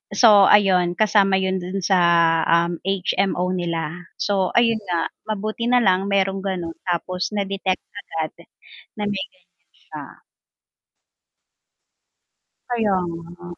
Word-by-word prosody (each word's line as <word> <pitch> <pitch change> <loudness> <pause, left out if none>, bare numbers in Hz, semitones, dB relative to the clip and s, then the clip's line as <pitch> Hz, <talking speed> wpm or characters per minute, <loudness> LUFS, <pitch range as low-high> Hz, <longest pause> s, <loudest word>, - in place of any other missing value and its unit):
So 205 -3 +6
ayun 185 -4 +4
kasama 200 -1 +3
yun 190 0 0
dun 185 +2 -5
sa, 185 +1 +3 0.5
um, 170 0 +1
HMO 190 -1 0
nila, 170 -1 -4
so 195 -2 -1
ayun 230 -2 +3
nga, 175 -2 -1 0.2
mabuti 215 +2 -3
nalang 200 -6 +3
merong 195 -1 0
ganon 185 -4 -4 0.2
tapos 180 +1 -2
na-detect 195 -2 -2
agad 165 -6 -5 0.7
na 210 - -2
may 200 -2 -2
ganyan 275 - -31 0.5
s'ya. - - -7 2.6
Kaya 225 -5 0
nga. 170 +1 -9
190 Hz, 110 wpm, -21 LUFS, 175-205 Hz, 2.6 s, So